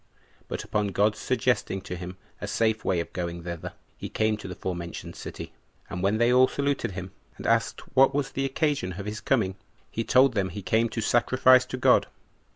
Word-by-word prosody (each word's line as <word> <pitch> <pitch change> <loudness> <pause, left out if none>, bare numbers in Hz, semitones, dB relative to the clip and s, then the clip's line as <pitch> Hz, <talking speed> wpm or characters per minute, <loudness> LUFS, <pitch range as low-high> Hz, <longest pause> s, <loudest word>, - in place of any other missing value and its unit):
But - - -4
upon 105 -1 -1
God's 105 +3 +1
suggesting 125 -6 0
to 90 -1 -6
him 90 +1 -7 0.2
a - - -3
safe 110 -1 +1
way 90 -2 +1
of - - -9
going 85 -1 -4
thither, 85 +1 -6 0.2
he - - -7
came 110 0 +1
to 105 - -8
the 90 - -6
forementioned 85 -2 -5
city; - - -8 0.4
and 90 - -4
when 100 +3 +2
they 120 +2 +3
all 130 +1 +6
saluted 140 -7 -1
him, 90 0 -6 0.3
and - - -9
asked - - +1
what 135 +1 +6
was 140 -1 -1
the 135 - -2
occasion 135 - 0
of 100 +3 -7
his 105 +1 -5
coming, 95 -8 +1 0.3
he 115 - -2
told 130 +2 +5
them 100 -3 0
he 100 +3 -7
came 115 +4 +2
to 115 - -3
sacrifice 130 +3 +4
to 130 - -4
God. - - +4
110 Hz, 200 wpm, -27 LUFS, 95-130 Hz, 0.4 s, all